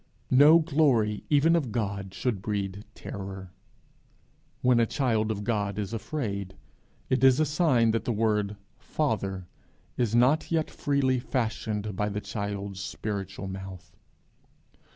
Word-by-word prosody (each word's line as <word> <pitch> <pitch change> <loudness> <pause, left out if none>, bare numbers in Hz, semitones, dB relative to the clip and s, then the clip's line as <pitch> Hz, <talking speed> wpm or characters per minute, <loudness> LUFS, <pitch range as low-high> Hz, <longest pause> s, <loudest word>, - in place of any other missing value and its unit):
No 145 +5 +8
glory 140 -10 +2
even 155 +3 +4
of 140 -9 0
God 100 -3 -3
should 115 -7 -1
breed 100 -1 -3
terror; 95 -2 -7 1.1
when 125 -1 +4
a 115 - +3
child 110 -5 0
of 105 -2 -3
God 100 -3 -1
is 105 +1 -3
afraid, 100 -6 -4 0.6
it 130 0 +2
is 130 0 +6
a 155 - +4
sign 145 -7 +3
that 115 - -1
the - - 0
word 105 -2 0 0.2
Father 95 -2 -2 0.5
is 115 -2 +1
not 130 +9 +3
yet 160 -2 0
freely 135 -3 +1
fashioned 110 -5 -2
by 105 +2 0
the 105 0 -3
child's 100 -2 -5
spiritual 100 -1 -5
mouth. 95 -2 -8
110 Hz, 130 wpm, -27 LUFS, 100-130 Hz, 1.1 s, No